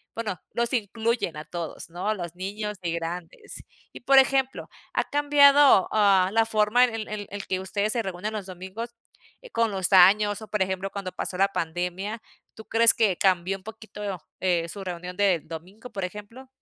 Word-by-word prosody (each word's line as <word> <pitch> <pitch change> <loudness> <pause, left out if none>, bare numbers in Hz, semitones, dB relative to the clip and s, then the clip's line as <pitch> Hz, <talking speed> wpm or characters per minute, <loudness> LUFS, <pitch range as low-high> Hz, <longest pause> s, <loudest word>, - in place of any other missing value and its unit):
bueno 210 -6 -4
los 235 +1 -1
incluyen 225 -5 -1
a 150 - -7
todos, 170 +1 -6
¿no?, 175 +4 -5
a - - +2
los 175 -4 -6
niños 205 +3 -5
y 170 -2 -2
grandes. 170 0 -6 0.3
Y - - -10
por 270 +2 +4
ejemplo, 265 0 +1 0.2
¿ha - - +1
cambiado, 285 -5 +6
ah, 195 -3 +4
la 225 0 +4
forma 220 +2 +3
en 240 - -5
el 220 -1 -5
el 210 -1 -5
el 200 -1 -7
que 185 - -1
ustedes 200 +3 -1
se 235 - 0
reúnen 190 +2 -4
los 210 -3 -4
domingos, 190 +6 -8 0.5
eh, - - -13
con 230 -1 +1
los 190 -1 -2
años? 205 +3 +6
O, 220 - -9
por 210 -2 -2
ejemplo 190 +1 -1
cuando 195 -2 -5
pasó 180 - -5
la 195 +1 +4
pandemia, 180 +5 -3 0.3
¿tú 220 - -12
crees 230 0 +5
que 205 -6 +2
cambió 190 0 +1
un 190 - -21
poquito, 210 -4 -7 0.2
eh, 175 -3 +1
su 200 +3 -7
reunión 180 0 -6
del 190 -7 +2
domingo 180 +9 -9
por 195 - -4
ejemplo? 210 +7 -10
200 Hz, 190 wpm, -25 LUFS, 180-225 Hz, 0.5 s, cambiado